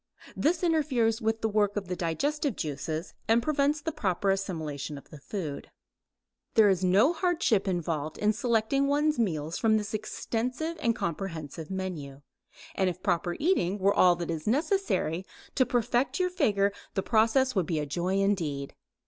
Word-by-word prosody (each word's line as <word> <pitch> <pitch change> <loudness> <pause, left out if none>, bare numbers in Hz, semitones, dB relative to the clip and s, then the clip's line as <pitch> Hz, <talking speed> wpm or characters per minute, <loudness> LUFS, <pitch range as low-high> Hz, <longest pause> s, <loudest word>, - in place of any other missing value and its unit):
This 330 +3 +1
interferes 265 -9 +2
with 220 0 0
the 220 - +1
work 205 -1 +1
of 200 -3 -3
the 180 - -2
digestive 275 - -1
juices 155 +3 -4
and 230 +1 +3
prevents 295 0 +1
the 320 - -2
proper 195 - 0
assimilation 155 -7 -3
of 140 - -14
the 150 - -10
food. 155 -2 -5 0.9
There 215 -2 +7
is 190 -1 +1
no 200 - +4
hardship 335 - +1
involved 165 -4 -2
in 210 +1 +2
selecting 235 +4 +1
one's 295 0 +2
meals 160 -7 -1
from 220 -1 +3
this 215 +1 -4
extensive 250 +8 -3
and 230 -1 +2
comprehensive 165 -4 -4
menu, 165 -8 -5 0.5
and 190 -1 +1
if 180 +1 -7
proper 175 0 0
eating 280 - +1
were 200 0 +3
all 180 -1 +5
that 170 -1 -4
is 160 +1 -5
necessary 285 - 0 0.3
to 260 -3 +2
perfect 245 - +1
your 365 0 +1
figure 205 - +2 0.2
the 195 - 0
process 240 +4 +3
would 185 -6 0
be 165 - -1
a 150 - -1
joy 175 +6 -1
indeed. 165 -9 0
205 Hz, 165 wpm, -28 LUFS, 170-255 Hz, 0.9 s, There